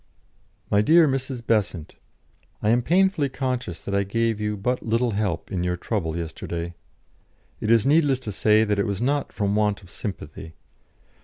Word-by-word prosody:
"My 100 - +4
Dear 160 +7 +6
Mrs. 130 -3 -3
Besant, 100 -8 0 0.7
I 105 - +3
am 120 +1 +3
painfully 175 0 +2
conscious 125 - -3
that 100 - -5
I 100 - +3
gave 115 +2 0
you 105 0 -1
but 125 +6 -1
little 115 +2 +1
help 100 -5 -2
in 90 -2 -1
your 90 0 -1
trouble 85 -5 -2
yesterday. 85 +1 -5 0.9
It 105 - -3
is 115 -2 +4
needless 145 -2 +4
to 110 - -4
say 105 +2 +3
that 105 -2 0
it 100 - +1
was 100 -2 -2
not 140 +4 0
from 100 -1 -1
want 105 -1 +1
of 90 - -15
sympathy. 80 -4 -7
105 Hz, 170 wpm, -24 LUFS, 100-125 Hz, 0.9 s, Dear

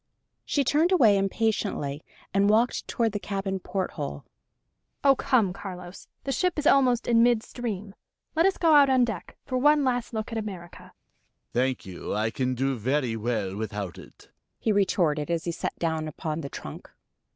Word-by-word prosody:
She 285 - +1
turned 305 +7 +2
away 235 - +6
impatiently 195 -7 -1 0.3
and 200 +1 +3
walked 225 +3 +2
toward 230 -2 0
the 205 - -3
cabin 195 -1 -3
porthole. 165 - -4 0.8
"Oh, 275 -1 +6
come, 230 -9 +2
Carlos. 180 -2 -9 0.2
The 275 - -2
ship 360 +6 0
is 300 - -2
almost 255 -5 +4
in 230 -1 +5
mid 235 -2 +4
stream. 210 -5 -5 0.4
Let 330 +4 +4
us 390 - 0
go 330 -2 +4
out 285 -2 +7
on 255 -2 +4
deck, 220 -7 -6
for 255 -2 -1
one 295 +2 +4
last 245 -2 0
look 220 0 -4
at 225 - -2
America." 185 -5 -8 0.6
"Thank 130 +1 0
you; 95 +1 -5
I 110 +2 0
can 130 +1 -1
do 135 +2 0
very 130 0 0
well 110 -4 -2
without 105 -4 -5
it!" - - -16 0.3
he 220 - 0
retorted, 170 -7 +1
as 170 -1 0
he 170 - -2
sat 170 - -4
down 160 -2 -1
upon 155 +1 -4
the 140 - -6
trunk. - - -9
195 Hz, 175 wpm, -26 LUFS, 150-245 Hz, 0.8 s, out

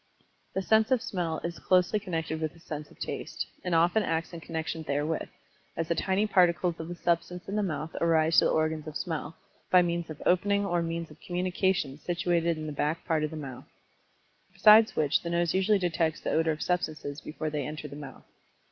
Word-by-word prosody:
The 190 - 0
sense 220 +3 +4
of 260 -2 +3
Smell 175 -9 -2
is 170 0 -4
closely 185 +3 +3
connected 165 -5 -3
with 155 0 -2
the 170 - -18
sense 150 -2 -7
of - - -19
Taste, - - -4 0.2
and 180 -2 0
often 170 +6 +4
acts 165 -3 -2
in 170 - -6
connection 160 0 -4
therewith, 150 +1 -2 0.5
as 165 0 -1
the - - +3
tiny 190 +4 +1
particles 180 -4 +3
of 160 - -5
the 175 - -5
substance 175 +1 -1
in 200 - -3
the 210 - +2
mouth 155 -4 -3
arise 165 -1 +4
to - - +3
the - - +3
organs 155 -1 0
of 155 - -4
Smell, 160 -2 -4 0.3
by 180 -1 +6
means 170 -1 -2
of 155 - -7
the - - -5
opening 200 +3 +3
or 175 -3 +1
means 165 -1 -3
of - - -16
communication 180 -5 -1
situated 170 -1 0
in 155 - -5
the 155 - -4
back 150 +3 -1
part 160 -3 +1
of 155 - 0
the 160 - -7
mouth. 135 -4 -8 0.8
Besides 215 +3 +7
which 150 -1 +2
the 170 - -4
nose 170 -1 +1
usually 190 +3 +3
detects 165 -3 0
the - - -2
odor 160 0 +2
of 155 - -3
substances 155 -5 -2
before 155 0 -4
they 145 -3 -2
enter 150 0 -6
the 140 - -9
mouth. 145 -3 -10
170 Hz, 210 wpm, -29 LUFS, 155-180 Hz, 0.8 s, Besides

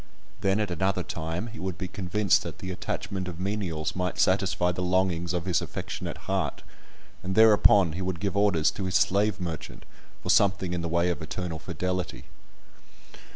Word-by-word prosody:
Then 100 +1 +1
at 105 -3 -1
another 95 +1 0
time 80 +4 -4
he 115 -1 -9
would 95 -1 -4
be 95 - -4
convinced 95 +1 +1
that - - -7
the 95 - -5
attachment 95 +1 -4
of 85 -2 -6
menials 90 -6 -2
might 90 0 -2
satisfy 95 -1 +2
the 90 - -4
longings 90 -2 +1
of 90 -1 -2
his 90 -4 +1
affectionate - - -6
heart, - - -1 0.6
and 95 +1 -3
thereupon 105 -5 +6
he 85 +4 -5
would 95 -2 -2
give 100 +2 -2
orders 100 -6 +3
to 95 - -5
his 95 0 -2
slave 100 +1 +3
merchant 85 -5 -6 0.4
for - - +2
something 95 -2 +3
in 90 - -1
the 85 - -3
way 85 +1 +2
of 85 - -4
eternal 80 0 -4
fidelity. 90 +1 -3
90 Hz, 175 wpm, -27 LUFS, 85-100 Hz, 0.6 s, thereupon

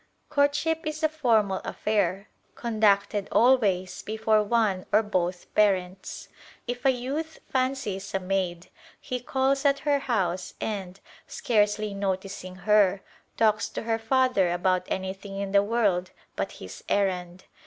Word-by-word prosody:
Courtship 305 +2 +1
is 310 +1 -4
a 315 - +4
formal 225 -10 +1
affair 200 -2 -1 0.3
conducted 205 -3 +1
always 210 -7 +3
before 220 0 +1
one 210 -4 +1
or 215 +2 +4
both 180 -3 -2
parents. 190 -3 0 0.4
If 245 +1 -5
a - - +6
youth 280 +6 -2
fancies 255 -7 -1
a - - +2
maid, 185 -2 -2 0.3
he 250 - -4
calls 265 +2 0
at 280 -1 +4
her 290 -1 +3
house 185 -8 -1
and, 195 -3 -4 0.3
scarcely 210 -2 +1
noticing 190 -1 -4
her, 205 -2 +4 0.3
talks 215 -1 +2
to - - -5
her 225 0 0
father 225 -6 +2
about 180 +1 +1
anything 190 +1 -4
in 200 0 -3
the 200 0 +5
world 205 -4 +1 0.3
but - - -3
his - - -10
errand. 185 -2 -1
210 Hz, 130 wpm, -26 LUFS, 190-245 Hz, 0.4 s, a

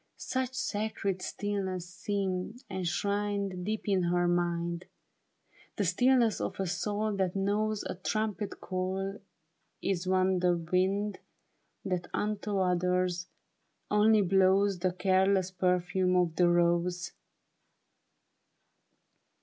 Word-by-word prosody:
Such 260 0 -2
sacred 205 -5 -2
stillness 190 -4 -3
seemed 190 +4 -3
enshrined 200 +1 -1
Deep 215 +3 -3
in 195 -2 +3
her 175 0 +2
mind; 175 0 0 0.9
The 205 - 0
stillness 235 +5 +3
of - - -4
a 195 - 0
soul 205 +4 -1
that 190 -1 0
knows 205 +2 0
A - - -4
trumpet 210 +2 -2
call 190 +2 -3 0.6
is 190 -2 -1
on 185 0 +2
the 175 -1 +2
wind 190 +4 0 0.7
That 180 -2 -2
unto 210 -1 -1
others, 180 -1 +1 0.6
only 210 0 +5
blows 190 +1 +3
The 185 +1 +1
careless 190 0 +2
perfume 180 0 +1
of 175 -3 +2
the 175 0 +4
rose. 175 +1 +1
190 Hz, 105 wpm, -30 LUFS, 180-205 Hz, 0.9 s, only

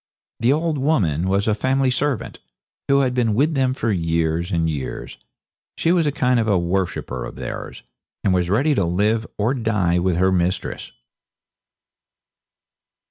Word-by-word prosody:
The 115 +3 +3
old 155 0 0
woman 95 - +1
was 100 +2 +1
a 110 - +3
family 130 +4 +1
servant, 140 -1 -2 0.5
who 140 0 +4
had 130 -2 +1
been 115 -4 +1
with 150 +7 +2
them 130 -2 +1
for 115 -4 -1
years 85 0 0
and 85 -1 +1
years. 75 -5 -5 0.6
She 165 - +2
was 170 -3 +2
a - - +2
kind 125 -3 +1
of 110 - 0 0.2
worshipper 85 -8 -2
of - - -7
theirs, - - -7 0.4
and 95 - +2
was 90 -1 +1
ready 135 +10 +2
to 100 - +1
live 105 +6 +1
or 110 +5 +1
die 105 -8 +1
with 90 0 +1
her 95 +1 +3
mistress. 90 +1 -1
105 Hz, 155 wpm, -21 LUFS, 90-130 Hz, 0.6 s, who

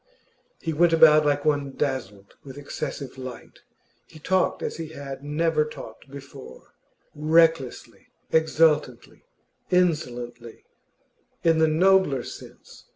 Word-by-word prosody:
He 165 - -3
went 165 +2 +3
about 155 -2 +6
like 145 0 0
one 145 -2 0
dazzled 105 -9 -4
with 135 -1 -11
excessive 140 -2 -6
light. 130 -1 -10 0.5
He 160 - -15
talked 185 +4 0
as - - -4
he 165 -1 -6
had 140 -3 -9
never 155 +1 +1
talked 140 -5 -11
before, 140 0 -12 0.4
recklessly, 155 -3 +1 0.2
exultantly, 155 -5 +1 0.4
insolently 120 -10 -2 0.8
in 165 -1 +3
the 160 - +4
nobler 165 -5 +3
sense. - - -12
150 Hz, 110 wpm, -24 LUFS, 135-160 Hz, 0.8 s, about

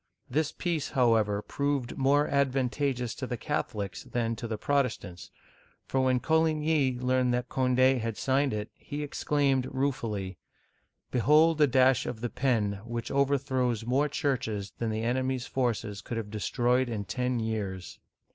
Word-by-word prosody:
This 150 +3 0
peace, 165 -5 -2
however, 110 -5 +2
proved 140 -3 -2
more 140 +2 +3
advantageous 135 -2 0
to 130 - -5
the 125 - -3
Catholics 105 -9 -3
than 115 -1 -2
to 120 - -5
the 110 -1 -3
Protestants, 115 -10 -1 0.6
for 135 - -1
when 130 -1 +2
Coligny 155 -3 +2
learned 125 0 +1
that 125 0 -3
Cond6 130 0 +3
had 115 -1 -3
signed 135 +1 +1
it, 105 0 -4
he 145 +1 -6
exclaimed 140 -2 +1
ruefully: 115 -9 -2 0.7
"Behold 155 +5 +4
a 150 - +7
dash 130 0 +3
of 110 -2 -5
the 120 - -3
pen 105 -7 0
which 120 0 -5
overthrows 130 -4 +1
more 135 +5 +2
churches 120 -9 -2
than 115 - -1
the 110 +1 -2
enemy's 130 +1 0
forces 115 -6 -2
could 115 - -5
have 105 -2 -5
destroyed 125 +3 +1
in 105 -3 -3
ten 125 +5 -1
years 100 -5 -4
125 Hz, 145 wpm, -29 LUFS, 115-140 Hz, 0.7 s, a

